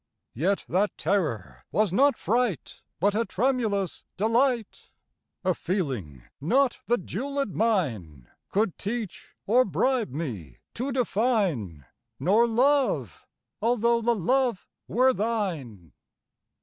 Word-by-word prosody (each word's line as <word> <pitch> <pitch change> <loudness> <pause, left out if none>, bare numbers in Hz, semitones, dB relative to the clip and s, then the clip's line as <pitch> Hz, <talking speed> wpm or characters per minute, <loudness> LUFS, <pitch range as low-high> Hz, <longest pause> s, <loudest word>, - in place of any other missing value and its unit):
Yet 185 - 0
that 200 +4 0
terror 110 - -1
was 210 -4 +1
not 275 +3 +4
fright, 230 - -1 0.2
But 200 +3 +2
a 225 +2 +1
tremulous 215 -4 -1
delight— 230 +2 0 0.6
A 185 - +3
feeling 130 - -3 0.2
not 255 - +2
the 240 - +3
jewelled 270 +5 -3
mine 115 - -1 0.2
Could 205 -2 0
teach 215 -2 -5
or 245 +5 +5
bribe 255 -2 0
me 115 - -6 0.2
to 260 +4 -3
define— 195 - 0 0.3
Nor 220 +6 +4
Love—although 235 - 0
the 235 +1 +2
Love 240 +1 +1 0.2
were 255 +5 +3
thine. 170 - -3
205 Hz, 105 wpm, -26 LUFS, 155-240 Hz, 0.6 s, or